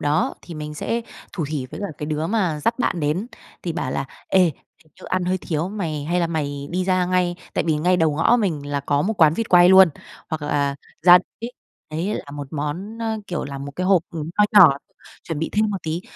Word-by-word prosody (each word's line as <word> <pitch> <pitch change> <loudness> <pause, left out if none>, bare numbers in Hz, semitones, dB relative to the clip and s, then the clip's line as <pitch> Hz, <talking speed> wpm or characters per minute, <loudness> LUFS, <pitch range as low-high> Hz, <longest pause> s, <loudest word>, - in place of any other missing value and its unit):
đó 150 +2 +1
thì 170 - -9
mình 150 0 -6
sẽ 230 +9 -2 0.3
thủ 165 -6 -3
thỉ 145 -4 -3
với 130 - -9
cả 200 - -2
cái 150 - -4
đứa 155 +1 -2
mà 180 -7 0
dắt 230 +2 +1
bạn 175 - 0
đến, 155 +8 -1 0.4
thì 170 - -2
bảo 130 -5 -3
là - - -2 0.2
"Ê, 190 - +4
hình 160 -1 -5
như - - -12
ăn 185 -1 -1
hơi 185 +1 0
thiếu, 165 -1 -2
mày 165 -8 -4
hay 175 +3 0
là 170 - +2
mày 145 -3 -3
đi 180 +1 -1
ra 185 -1 +2
ngay" 180 -1 +1 0.2
tại - - 0
vì 160 -2 +1
ngay 180 +4 +2
đầu 160 -3 +2
ngõ 165 +10 +4
mình 155 -8 -2
là 145 0 -2
có 145 +1 0
một 220 +7 -1
quán 155 0 +6
vịt 230 - -2
quay 175 0 +7
luôn, 190 -1 +8 0.4
hoặc 160 -2 -3
là 140 -1 0 0.3
ra 180 +1 +9 0.2
tít 235 - -5 0.4
đấy 175 +7 -2
là 145 - -6
một 145 -1 -6
món, 165 +9 -4
ơ, 225 -1 -2
kiểu, 175 - -3
là 140 -1 -6
một 140 +1 -6
cái 180 - -1
hộp, 190 -4 +4
ừm, 160 -1 -5
nho 210 - +7 0.2
nhỏ, 150 -6 +8 0.5
chuẩn 160 -3 -4
bị 165 - -2
thêm 215 +1 +2
một 200 - -1
tí. 160 +2 -3
165 Hz, 240 wpm, -22 LUFS, 150-185 Hz, 0.5 s, ra